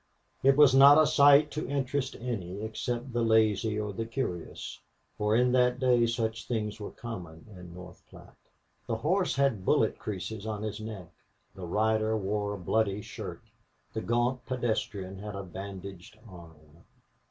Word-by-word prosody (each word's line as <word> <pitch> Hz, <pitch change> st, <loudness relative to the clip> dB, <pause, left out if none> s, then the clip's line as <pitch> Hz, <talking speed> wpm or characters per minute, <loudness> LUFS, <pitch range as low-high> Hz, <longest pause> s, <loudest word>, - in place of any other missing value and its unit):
It 135 Hz, +1 st, +4 dB
was 145 Hz, -3 st, +7 dB
not 140 Hz, +2 st, +8 dB
a 155 Hz, -, +6 dB
sight 145 Hz, 0 st, +6 dB
to 150 Hz, -4 st, -4 dB
interest 140 Hz, -1 st, -2 dB
any 100 Hz, -6 st, -4 dB
except 120 Hz, +3 st, -4 dB
the 120 Hz, -, 0 dB
lazy 110 Hz, -1 st, +2 dB
or 105 Hz, -1 st, -3 dB
the 115 Hz, +3 st, -4 dB
curious, 115 Hz, -9 st, -5 dB, 0.4 s
for 105 Hz, +1 st, +1 dB
in 125 Hz, +1 st, +3 dB
that 125 Hz, 0 st, +3 dB
day 125 Hz, -2 st, +3 dB
such 115 Hz, 0 st, -2 dB
things 105 Hz, -3 st, -3 dB
were 105 Hz, -, -6 dB
common 90 Hz, -9 st, -9 dB
in 90 Hz, -1 st, -11 dB
North 90 Hz, 0 st, -12 dB
Platte. -, -, -15 dB, 0.5 s
The 115 Hz, -, -1 dB
horse 180 Hz, -, 0 dB
had 135 Hz, -8 st, +1 dB
bullet -, -, +2 dB
creases 105 Hz, +1 st, -5 dB
on 105 Hz, -1 st, -4 dB
his 110 Hz, -1 st, -4 dB
neck; 105 Hz, -6 st, -8 dB, 0.4 s
the 90 Hz, -2 st, -8 dB
rider 110 Hz, +3 st, +1 dB
wore 105 Hz, 0 st, -2 dB
a -, -, -9 dB
bloody 100 Hz, +2 st, 0 dB
shirt; -, -, -8 dB, 0.5 s
the 110 Hz, -, -3 dB
gaunt 120 Hz, +2 st, 0 dB
pedestrian 105 Hz, -6 st, -3 dB
had 105 Hz, 0 st, -7 dB
a 100 Hz, -, -5 dB
bandaged 95 Hz, +1 st, -9 dB
arm. 80 Hz, -5 st, -15 dB
110 Hz, 160 wpm, -29 LUFS, 100-125 Hz, 0.5 s, not